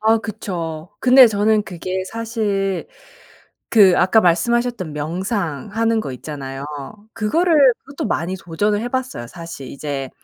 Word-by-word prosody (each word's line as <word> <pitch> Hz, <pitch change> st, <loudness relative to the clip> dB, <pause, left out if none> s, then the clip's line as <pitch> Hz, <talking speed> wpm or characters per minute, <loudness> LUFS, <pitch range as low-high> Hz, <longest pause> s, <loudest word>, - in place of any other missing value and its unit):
아 220 Hz, +1 st, +4 dB
그쵸. 175 Hz, -7 st, -5 dB
근데 255 Hz, 0 st, +8 dB
저는 215 Hz, 0 st, +2 dB
그게 185 Hz, 0 st, -4 dB
사실 210 Hz, -3 st, -2 dB, 0.8 s
그 200 Hz, -5 st, +6 dB
아까 185 Hz, +5 st, +4 dB
말씀하셨던 220 Hz, 0 st, +1 dB
명상하는 190 Hz, -, -1 dB
거 135 Hz, -, -5 dB
있잖아요. 135 Hz, 0 st, -7 dB, 0.5 s
그거를 315 Hz, +10 st, +2 dB, 0.2 s
그것도 275 Hz, -3 st, -6 dB
많이 185 Hz, -1 st, -2 dB
도전을 205 Hz, +5 st, -1 dB
해 240 Hz, -, -3 dB
봤어요. 255 Hz, -, -3 dB
사실 165 Hz, -2 st, -9 dB
이제 140 Hz, -2 st, -5 dB
195 Hz, 275 characters per minute, -20 LUFS, 165-225 Hz, 0.8 s, 근데